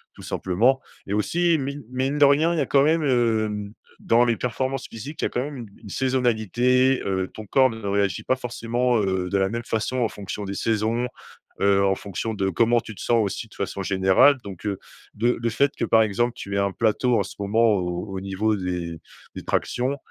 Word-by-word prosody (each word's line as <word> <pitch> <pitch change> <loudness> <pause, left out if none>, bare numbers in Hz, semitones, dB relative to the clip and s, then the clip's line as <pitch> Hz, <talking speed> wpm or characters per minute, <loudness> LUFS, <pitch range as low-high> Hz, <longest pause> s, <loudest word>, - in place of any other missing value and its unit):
tout - - -12
simplement, 120 +9 +1 0.2
et 100 - -4
aussi 165 - +2
mi 140 +1 -4
mine 135 +3 -1
de 145 - +7
rien 145 +4 +4
il - - -2
y - - +2
a - - +1
quand 140 +1 +3
même, 160 +1 +2
hem 110 -5 0 0.3
dans 120 +1 +3
les 120 -1 +2
performances 130 +2 -3
physiques. 135 +8 -8
Il - - +1
y - - +3
a - - -7
quand 125 - -2
même 145 -1 -6
une 115 -3 -7 0.2
une 105 - -10
saisonnalité, 125 +1 +2
heu, 95 -1 -1
ton 110 - -9
corps 130 +5 +4
ne 115 - -7
réagit 100 0 0
pas 130 - +1
forcément, 120 0 -1
heu, 95 -2 -1
de 100 - +1
la 95 0 +1
même 115 +1 -4
façon 115 +3 -2
en 120 -3 +2
fonction 100 0 -6
des 100 0 -5
saisons, 115 +2 0 0.6
heu, 100 0 +4
en 95 - +3
fonction 100 +4 -4
de 95 -2 -1
comment 115 +6 +2
tu 110 - -10
te - - -10
sens 115 -2 +2
aussi 105 +3 -4
de - - -19
façon 100 0 -4
générale, 95 +9 +4
donc, 100 -1 -9
heu, 100 -2 -2 0.4
de 120 +3 +1
le 115 - +1
fait 140 +5 +2
que - - 0
par 110 - +4
exemple 115 +3 +1
tu 100 0 -6
aies - - +1
un 100 -1 +1
plateau 115 +2 +1
en - - +1
ce - - -10
moment 110 +2 +3
au 90 +1 -2
au - - -2
niveau 100 +3 0
des 90 -3 -4 0.4
des - - -7
tractions, 130 +3 -1
115 Hz, 225 wpm, -24 LUFS, 100-125 Hz, 0.6 s, de